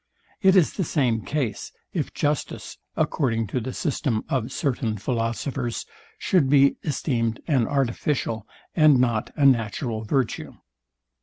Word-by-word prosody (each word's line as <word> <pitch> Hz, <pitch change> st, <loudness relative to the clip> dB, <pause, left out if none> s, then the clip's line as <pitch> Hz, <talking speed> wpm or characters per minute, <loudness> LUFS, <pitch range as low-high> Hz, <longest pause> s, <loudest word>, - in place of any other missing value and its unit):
It 190 Hz, -2 st, +5 dB
is 180 Hz, -5 st, +4 dB
the 190 Hz, -, -1 dB
same 125 Hz, -8 st, +1 dB
case, 130 Hz, -7 st, -3 dB, 0.2 s
if -, -, -2 dB
justice, 145 Hz, -1 st, -2 dB, 0.2 s
according 115 Hz, -6 st, +1 dB
to 130 Hz, -, +1 dB
the 125 Hz, +2 st, -4 dB
system 130 Hz, -6 st, -1 dB
of 130 Hz, -2 st, -1 dB
certain 125 Hz, -6 st, -1 dB
philosophers, 120 Hz, +3 st, -2 dB, 0.3 s
should 180 Hz, -, +2 dB
be 140 Hz, 0 st, +5 dB
esteemed 120 Hz, -6 st, -1 dB
an 135 Hz, -8 st, +2 dB
artificial 125 Hz, -4 st, -1 dB, 0.3 s
and 155 Hz, -5 st, +6 dB
not 120 Hz, -3 st, +1 dB
a 145 Hz, -, +2 dB
natural 115 Hz, -2 st, +1 dB
virtue. 125 Hz, +1 st, -1 dB
130 Hz, 130 wpm, -24 LUFS, 115-145 Hz, 0.3 s, and